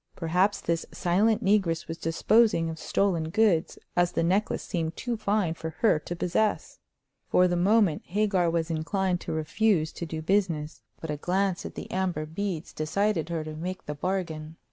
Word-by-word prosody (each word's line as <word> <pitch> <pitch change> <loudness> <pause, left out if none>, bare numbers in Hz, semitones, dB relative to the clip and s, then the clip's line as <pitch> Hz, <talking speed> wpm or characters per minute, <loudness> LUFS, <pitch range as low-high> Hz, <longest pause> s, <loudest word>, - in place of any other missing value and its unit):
Perhaps 180 +4 +1
this 165 -1 -1
silent 205 +5 +2
negress 190 -5 +2
was 165 +1 -6
disposing 165 +1 +3
of 160 - -8
stolen 170 -5 0
goods, 180 -3 +2 0.2
as 175 0 +2
the - - +1
necklace 190 +5 +1
seemed 165 -3 -3
too 245 -2 -2
fine 205 -5 0
for 165 0 -5
her 215 -9 +4
to 175 +3 -6
possess. 185 +5 -1 0.5
For 180 - +4
the 175 - 0
moment 190 -2 +3
Hagar 195 -2 +1
was 165 0 -1
inclined 180 +3 -1
to - - -5
refuse 160 +2 +1
to 170 - -5
do 160 0 -5
business; 165 -5 0 0.2
but 160 - -5
a 150 - -3
glance 190 +4 0
at - - -12
the - - -7
amber 180 -5 -1
beads 170 0 -4
decided 170 +2 0
her 165 -2 -2
to 155 0 -7
make 180 +4 -5
the 150 - -4
bargain. 160 -2 -3
175 Hz, 175 wpm, -27 LUFS, 160-200 Hz, 0.5 s, her